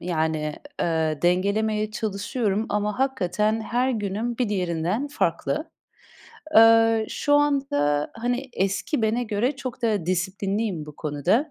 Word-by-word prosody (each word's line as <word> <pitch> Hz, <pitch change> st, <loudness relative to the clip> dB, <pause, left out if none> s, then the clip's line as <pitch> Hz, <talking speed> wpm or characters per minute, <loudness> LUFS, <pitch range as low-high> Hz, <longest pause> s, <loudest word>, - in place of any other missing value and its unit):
Yani, 160 Hz, -3 st, -1 dB, 0.3 s
eee, 160 Hz, -2 st, 0 dB
dengelemeye 210 Hz, +4 st, +1 dB
çalışıyorum 215 Hz, +1 st, -2 dB
ama 210 Hz, +3 st, -1 dB
hakikaten 220 Hz, -4 st, 0 dB
her 245 Hz, +4 st, 0 dB
günüm 220 Hz, +2 st, -2 dB
bir 245 Hz, -4 st, +1 dB
diğerinden 185 Hz, -, -1 dB
farklı. -, -, -1 dB, 0.9 s
Eee, 225 Hz, 0 st, +6 dB
şu 290 Hz, -1 st, +1 dB
anda, 270 Hz, -, +1 dB
hani, 245 Hz, +3 st, -2 dB
eski 200 Hz, +7 st, -1 dB
bene 230 Hz, +3 st, +1 dB
göre 230 Hz, +6 st, -1 dB
çok 255 Hz, -3 st, -6 dB
daha 210 Hz, -7 st, 0 dB
disiplinliyim 190 Hz, -1 st, -1 dB
bu 150 Hz, -, -11 dB
konuda. 155 Hz, -, 0 dB
210 Hz, 120 wpm, -24 LUFS, 180-235 Hz, 0.9 s, Eee